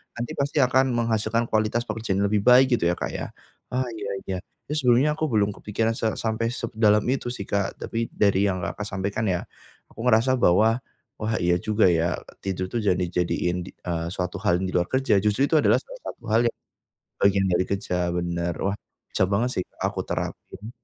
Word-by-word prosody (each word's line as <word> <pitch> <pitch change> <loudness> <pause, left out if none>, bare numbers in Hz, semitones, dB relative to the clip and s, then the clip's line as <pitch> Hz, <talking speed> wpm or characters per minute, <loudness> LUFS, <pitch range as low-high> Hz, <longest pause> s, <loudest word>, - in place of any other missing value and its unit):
nanti, 120 0 -4
pasti 140 0 +2
akan 130 +1 +3
menghasilkan 115 -1 +1
kualitas 110 +2 +1
pekerjaan 110 -4 -2
yang - - +3
lebih 105 -1 +2
baik, 130 +1 +7
gitu, 85 - +1
ya, 85 - +2
Kak, - - -4
ya. - - -4 0.4
Ah, 130 +1 0
iya 105 -3 -5 0.2
iya. 95 - -3 0.3
Terus, 150 +1 -2
sebelumnya, 125 +5 +5
aku 155 - +1
belum 105 -6 +2
kepikiran 110 +3 -1
se 115 - +1
sampai 110 0 -1
sedalam 110 -3 +2
itu, 135 -2 -2
sih, 120 -4 -4
Kak, 100 0 -1
tapi 115 0 -3
dari 100 -1 +2
yang 95 -2 -2
Kakak 105 - -4
sampaikan, 100 +3 -2
ya, 90 -2 0 0.5
aku - - -16
ngerasa 125 +3 +4
bahwa, 110 +4 +4 0.4
wah, 110 0 -1
iya 90 0 +3
juga, 105 -1 +3
ya, 85 +1 +1 0.2
tidur 95 -1 -3
itu - - -1
jangan 90 -2 +3
dijadiin, 90 0 -1
eee, 85 -3 -4
suatu 90 +1 -3
hal 95 -3 +1
di 95 - -2
luar 90 -1 +1
kerja, 130 -6 +2
justru 105 +6 +1
itu 155 +2 +4
adalah - - +4
salah - - -11
satu - - -8
hal 110 +2 +5
yang - - -2 0.6
bagian 100 -1 +3
dari 90 +1 +2
kerja, 100 -2 -2 0.2
benar. 85 0 -1
Wah, 100 +2 -1 0.3
bisa - - +2
banget, 100 +6 +1
sih, 90 - 0 0.2
aku - - -1
terapin. 105 +4 -5
105 Hz, 195 wpm, -25 LUFS, 95-115 Hz, 0.6 s, baik